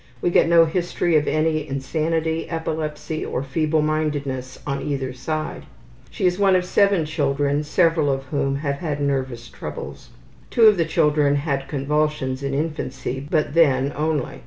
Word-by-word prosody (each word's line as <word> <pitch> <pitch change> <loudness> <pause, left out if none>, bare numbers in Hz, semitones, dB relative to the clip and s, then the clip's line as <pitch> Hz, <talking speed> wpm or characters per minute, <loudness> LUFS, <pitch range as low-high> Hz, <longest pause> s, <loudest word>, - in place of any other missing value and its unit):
We 175 - 0
get 165 - +4
no 170 -1 +6
history 175 0 0
of 150 -1 +3
any 155 -1 +1
insanity, 160 +4 -1
epilepsy, 155 -1 -3
or 130 - -3
feeblemindedness 150 -3 -1
on 140 -1 -2
either 135 -3 -3
side. 155 +4 -4 0.4
She 200 - -3
is 180 +1 +2
one 195 -2 +4
of 180 -1 +1
7 200 -3 +3
children, 145 -1 0
several 160 -1 +2
of 135 0 -2
whom 135 0 -1
have 140 0 -2
had 150 -2 -3
nervous 130 -4 -2
troubles. - - -8 0.4
Two 235 - +2
of 215 -3 +7
the 165 - +2
children 150 -2 +2
had 140 -2 -2
convulsions 145 -2 -1
in 140 0 -2
infancy, 135 -4 -3
but 155 -3 0
then 140 -4 +3
only. 155 0 -2
150 Hz, 155 wpm, -22 LUFS, 140-160 Hz, 0.4 s, of